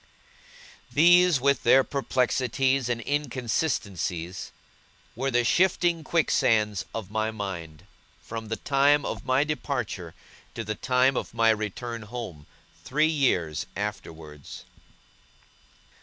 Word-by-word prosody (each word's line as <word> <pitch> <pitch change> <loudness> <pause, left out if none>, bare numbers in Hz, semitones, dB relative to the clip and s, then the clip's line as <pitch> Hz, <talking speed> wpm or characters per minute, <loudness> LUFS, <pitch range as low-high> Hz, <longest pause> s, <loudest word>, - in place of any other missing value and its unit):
These, 175 0 +5
with 140 +2 +2
their 135 0 +5
perplexities 130 -1 0
and 120 -1 -1
inconsistencies, 115 - -2 0.6
were 135 - -1
the 120 -2 +2
shifting 175 +3 +2
quicksands 105 - +1
of 110 -4 -5
my 110 0 0
mind, 90 -8 -6 0.3
from 115 -1 -7
the 110 - -2
time 140 +3 +2
of - - -5
my 130 +2 +3
departure 125 - -4 0.4
to 115 - -4
the 110 0 -3
time 130 +4 +2
of - - -4
my 115 0 +4
return 110 +2 -4
home, 110 -9 -8 0.4
three 150 +4 +2
years 90 - 0
afterwards. 75 -3 -7
120 Hz, 110 wpm, -26 LUFS, 105-140 Hz, 0.6 s, These